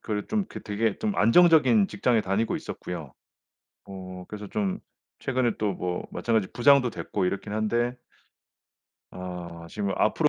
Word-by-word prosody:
그런 105 -2 -3
좀 215 -2 +1
그 - - -8
되게 105 0 0
좀 215 -2 -1
안정적인 125 - +6
직장에 110 +3 +2
다니고 100 +4 0
있었고요. 80 -7 -6 0.7
어 95 -2 -8
그래서 105 -1 -7
좀 200 -1 -1 0.4
최근에 130 -4 0
또 105 -2 0
뭐 90 -1 -3
마찬가지로 110 -5 0
부장도 130 0 +5
됐고 95 -3 -2
이렇긴 100 +2 -2
한데 120 +3 0 1.2
아 90 -2 -7
지금 100 +1 -3
앞으로 - - +3
105 Hz, 305 characters per minute, -26 LUFS, 95-125 Hz, 1.2 s, 안정적인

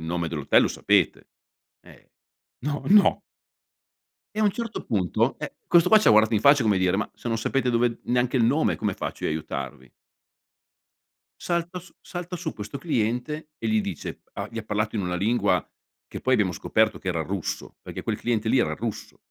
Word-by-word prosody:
nome 85 +1 -2
dell'hotel 75 -4 +3
lo - - +2
sapete?" - - +1 0.5
"Ehm, - - -18 0.6
No, 145 0 -2
no." 205 +1 +5 1.2
E - - -5
a 215 - +3
un 205 - +4
certo 230 0 -5
punto, 95 -7 0
eh, - - -5
questo 170 -1 +5
qua 220 - +8
ci 215 - -2
ha - - +8
guardato 110 +1 +5
in 105 - +2
faccia 140 -1 +6
come 105 -4 +2
dire: 95 0 +2
"Ma 105 - -2
se - - -11
non 115 -1 0
sapete 125 +3 0
dove 120 -1 +1
neanche 125 +1 +1
il 120 - +4
nome 140 +7 +2
come 105 -3 -2
faccio - - -5
io - - +1
a - - 0
aiutarvi?" 70 -4 -6 1.5
Salta 170 +1 -2
su 175 - -18
salta 175 0 -6
su 170 -2 -4
questo 105 +5 -7
cliente 140 +2 -2
e 115 - -5
gli 110 0 +2
dice 95 -7 -6
a - - -4
gli 115 - -6
ha - - -4
parlato 105 +1 -2
in - - 0
una 90 -2 -2
lingua 110 +7 +1 0.4
che - - -8
poi 130 - +2
abbiamo 100 -6 +2
scoperto 110 +4 +1
che 95 - -6
era 85 -3 0
russo, 95 +1 -4
perché - - -8
quel - - -2
cliente 110 -2 0
lì 130 - +4
era 120 - +1
russo. 115 -2 -6
115 Hz, 200 wpm, -25 LUFS, 100-145 Hz, 1.5 s, qua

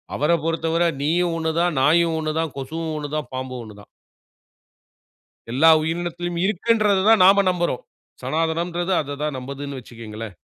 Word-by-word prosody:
அவர 150 +4 +1
பொறுத்தவர 165 +1 0 0.2
நீயும் 170 +3 +1
ஒண்ணு 160 0 -1
தான், 175 -2 +1
நாயும் 165 +3 +3
ஒண்ணு 155 -1 -2
தான், 160 -3 -2
கொசுவும் 160 +4 -4
ஒண்ணு 145 -1 -4
தான், 155 -1 -3
பாம்பும் 130 -1 -5
ஒண்ணு 110 -2 -11
தான். - - -18 1.6
எல்லா 145 +7 +5
உயிரினத்திலும் 175 +1 -3
இருக்குன்றத 210 -1 +2
தான் 215 -5 +6
நாம 200 +1 +6
நம்புறோம். 175 - -2 0.4
சனாதனம்ன்றது 170 +3 -1
அத 145 -1 -6
தான் 150 -3 -2
நம்புதுன்னு 140 +2 -6
வச்சுக்கோங்களேன். 110 -4 -9
160 Hz, 145 wpm, -22 LUFS, 140-175 Hz, 1.6 s, தான்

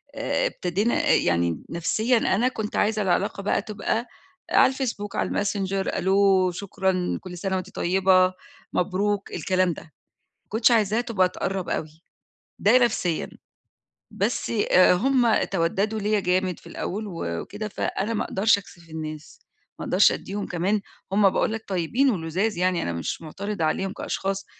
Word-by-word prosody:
آآ - - 0
ابتدينا 200 - -1
آآ - - +5
يعني 85 -1 +1
نَفْسيًا 220 +9 +1
أنا 225 +2 +2
كنت 220 -5 -4
عايزة 215 +1 +1
العلاقة 195 +1 0
بقى 205 - +1
تبقى 220 +3 -2 0.4
على 265 - +5
الFacebook، 235 -6 -4
على - - 0
الMessenger 195 -1 -1
ألو، 190 -1 +3
شكرًا، 185 -1 -1
كل 180 -1 -8
سَنة 190 +1 -2
وأنتِ 185 0 -4
طيّبة، 185 0 +3 0.4
مبروك 200 +2 0
الكلام 185 -2 +1
ده، - - -9
ما 155 - -26 0.4
كنتش 220 +3 +3
عايزاها 220 -1 +3
تبقى 215 -7 +1
تقرَّب 190 0 -3
أوي، 155 +1 -4 0.6
ده 220 +5 +5
نفسيًا. 215 -9 0 0.8
بس - - -1 0.2
آآ 185 0 +6
هم 245 +3 +3
تَوَدَّدوا 195 +4 0
ليّا 210 0 +1
جامد 185 -1 0
في - - -20
الأول 210 +3 -4
و 175 -4 -5 0.2
وكده، 210 +1 -6
فأنا 210 +2 -2
ما - - 0
أقدرش 205 +2 +3
أكسِف 170 -4 -14
الناس، 155 -1 -7 0.4
ما - - -5
أقدرش - - +5
أدّيهم 205 +1 -4
كمان 190 +4 0 0.3
هم 200 -1 +5
باقول - - 0
لك 225 0 -5
طيّبين 195 - +1
ولُذاذ 185 +2 -1
يعني 180 -1 +1
أنا 85 - -2
مش 85 - -4
مُعترضة 195 +3 -4
عليهم 190 +5 0
كأشخاص، 195 -1 -3
195 Hz, 150 wpm, -24 LUFS, 180-215 Hz, 0.8 s, آآ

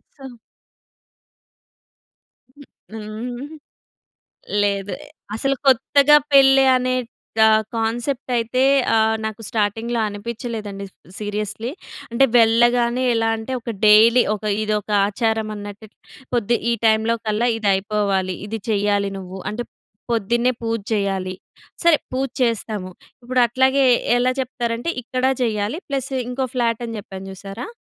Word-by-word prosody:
So 270 - -12 2.3
హ్మ్, 285 +2 -16 0.3
హ్మ్. 225 +5 -6 1.2
లేదు. 200 -1 -1 0.4
అసలు 275 +5 0
కొత్తగా 280 +3 +5 0.2
పెళ్ళి 270 -1 +6
అనే 255 0 0 0.4
కా 220 0 +7 0.3
కాన్సెప్ట్ 240 +4 -2
అయితే 235 +3 0 0.3
ఆహ్, 220 0 +3
నాకు 220 +1 -5
స్టార్టింగ్‌లో 225 +2 -1
అనిపిచలేదండి. 210 -1 -6 0.3
సీరియస్‌లీ. 210 +2 -4 0.4
అంటే 235 +4 +3
వెళ్ళగానే 240 +2 +3
ఎలా 225 0 +1
అంటే 225 +4 -6
ఒక 230 0 -5
డైలీ 225 +4 +7
ఒక 215 - -9 0.2
ఇదొక 210 -1 -2 0.2
ఆచారం 220 +1 -1
అన్నట్టు 205 +1 -9 0.5
పొద్ది 235 0 +1
ఈ - - +2
టైంలోకల్లా 220 +1 +1
ఇది 210 -2 -1
అయిపోవాలి 195 -2 -1
ఇది 220 +1 -5
చేయాలి 205 -1 +1
నువ్వు. 185 0 -8
అంటే 235 +3 -4 0.5
పొద్దున్నే 235 +3 +1
పూజ 230 0 -1
చేయాలి. 195 -3 -1 0.5
సరే 340 -2 +6 0.2
పూజ 265 +1 -1
చేస్తాము. 215 -5 -2 0.3
ఇప్పుడట్లాగే 255 +2 +2 0.3
ఎలా 245 +1 +2
చెప్తారంటే 240 +2 -3
ఇక్కడ 255 +2 -3 0.2
చేయాలి, 215 +1 -1
ప్లస్ 275 -2 -3 0.2
ఇంకో 255 +1 -2
ఫ్లాటని 230 -1 -1
చెప్పాను 195 -1 -10
చూసారా! 195 - -8
225 Hz, 110 wpm, -21 LUFS, 210-245 Hz, 2.3 s, కా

